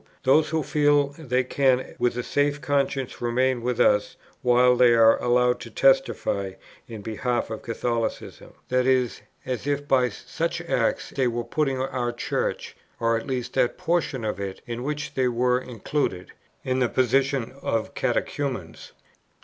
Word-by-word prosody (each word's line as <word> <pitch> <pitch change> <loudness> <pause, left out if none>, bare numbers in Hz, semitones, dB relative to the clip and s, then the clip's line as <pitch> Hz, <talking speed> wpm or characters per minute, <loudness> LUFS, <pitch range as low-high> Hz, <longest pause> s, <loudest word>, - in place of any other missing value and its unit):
those 150 +4 +4
who 160 -1 0
feel 145 -1 +3
they 130 -4 0
can 130 0 +1
with 120 0 +1
a 125 - -2
safe 145 +2 0
conscience 140 -2 -1
remain 125 +1 +1
with 125 0 -2
us 105 0 +3 0.3
while 125 0 +4
they 125 -1 +5
are 115 0 +5
allowed 125 0 +2
to 115 - -9
testify 120 -7 +1 0.3
in 110 -3 -8
behalf 120 +1 -2
of 110 - -5
Catholicism, 115 0 -3 0.2
i.e. 125 -1 +3 0.4
as 130 +1 -4
if 145 0 -1
by 130 -2 +3
such 165 +10 -4
acts 170 - -1
they 135 -3 +1
were 120 0 -2
putting 135 +2 -1
our 130 -2 -2
Church, 120 - -3 0.2
or 115 0 +2
at 115 - -4
least 130 -3 -3
that 120 - +1
portion 160 -8 -1
of 105 -3 -3
it 100 -1 -6
in 120 0 -5
which 145 +1 -4
they 130 -2 +1
were 125 +1 +2
included, 120 -6 -3 0.3
in 130 0 0
the 125 -2 +2
position 130 0 +1
of 115 -1 -2
catechumens." 125 - -3
125 Hz, 155 wpm, -25 LUFS, 120-135 Hz, 0.4 s, they